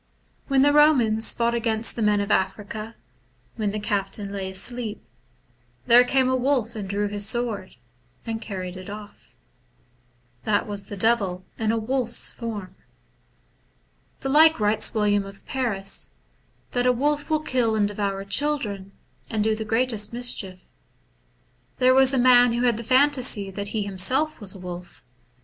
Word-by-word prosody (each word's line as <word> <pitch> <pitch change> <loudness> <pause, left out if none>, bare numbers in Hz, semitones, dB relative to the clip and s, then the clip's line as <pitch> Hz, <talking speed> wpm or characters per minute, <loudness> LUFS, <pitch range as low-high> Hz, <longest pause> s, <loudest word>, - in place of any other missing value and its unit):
When 270 -1 +3
the 290 - +5
Komans 255 -8 +4
fought 235 0 0
against 230 -1 0
the 235 - -4
men 210 -1 +2
of 200 - -3
Africa, 210 +3 -2 0.6
when 215 -3 -1
the 210 +1 -4
captain 200 -1 -3
lay 195 -1 -4
asleep, 220 +3 0 0.8
there 245 0 +7
came 260 +1 +1
a 260 - +1
wolf 250 -3 0
and 200 -3 -6
drew 205 +1 -1
his 205 0 0
sword, 235 -3 0 0.5
and 225 -1 -4
carried 185 -4 -6
it 185 +1 -10
off. 205 0 -11 1.1
That 205 +5 0
was 200 -1 -3
the 205 - -7
Devil 195 -4 0
in 220 -1 +1
a 230 - 0
wolf's 240 +1 0
form. 205 -6 -7 1.5
The 270 - -3
like 315 +1 +6
writes 210 +1 +1
William 205 -1 +2
of 195 0 -13
Paris, 210 -7 -2 0.3
— - - -40
that 245 0 0
a - - +5
wolf 290 +5 -1
will 310 -1 0
kill 240 -6 0
and 210 -1 +2
devour 200 -1 -3
children, 200 -4 -2 0.4
and 215 -2 -1
do 220 0 +1
the 220 - -4
greatest 225 -1 0
mischief. 205 -6 -2 1.2
There 255 0 +4
was 265 0 +5
a 270 - 0
man 245 -1 +5
who 240 +1 -1
had 240 -3 +2
the 235 - -6
phantasy 255 -6 +2
that 200 +1 -5
he 210 0 -2
himself 230 +11 -1
was 200 -3 -2
a - - -10
wolf. 180 0 -9
220 Hz, 160 wpm, -24 LUFS, 200-250 Hz, 1.5 s, there